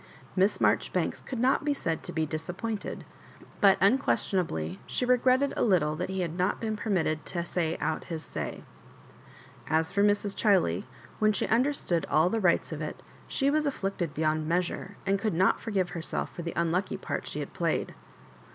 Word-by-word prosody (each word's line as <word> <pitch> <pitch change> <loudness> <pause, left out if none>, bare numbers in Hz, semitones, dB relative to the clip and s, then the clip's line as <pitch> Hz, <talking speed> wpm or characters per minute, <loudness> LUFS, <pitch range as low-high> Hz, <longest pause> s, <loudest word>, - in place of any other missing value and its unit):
Miss 195 +2 +3
Maijoribanks - - +1
could 260 - -5
not 255 +5 +2
be 290 -1 +1
said 165 - -2
to - - -7
be 160 -1 0
disappointed, 175 +8 -4 0.5
but 195 -2 +6
unquestion 200 -2 +3
ably 85 - -3
she 250 - -1
regretted 255 +2 +3
a - - -1
little 165 -8 +3
that 180 +3 -3
he 190 0 -2
had 170 -2 -2
not 185 +3 +1
been 220 -1 -2
permitted 175 -8 0
to 170 -1 -2
say 170 -2 -1
out 160 - -2
his 160 -2 -5
say. - - -5 1.0
As 160 +1 +1
for 200 - +1
Mrs. 205 -1 +2
Chiley, 200 -1 +2 0.3
when 215 0 +4
she - - 0
understood 235 - +1
all 160 +4 +4
the 225 - 0
rigfils 175 -3 +2
of - - -4
it, - - -5 0.2
she 275 0 +1
was 305 0 +2
afflicted 195 - -2
beyond 155 0 0
measure, 180 +3 -1
and 195 0 +2
oould 215 -1 0
not 185 +4 +3
forgive 195 -5 -1
herself 170 -3 -3
for - - -6
the 170 0 -4
unlucky 170 +3 0
part - - -4
she - - -4
had - - -5
played. - - -1
190 Hz, 180 wpm, -29 LUFS, 165-220 Hz, 1.0 s, but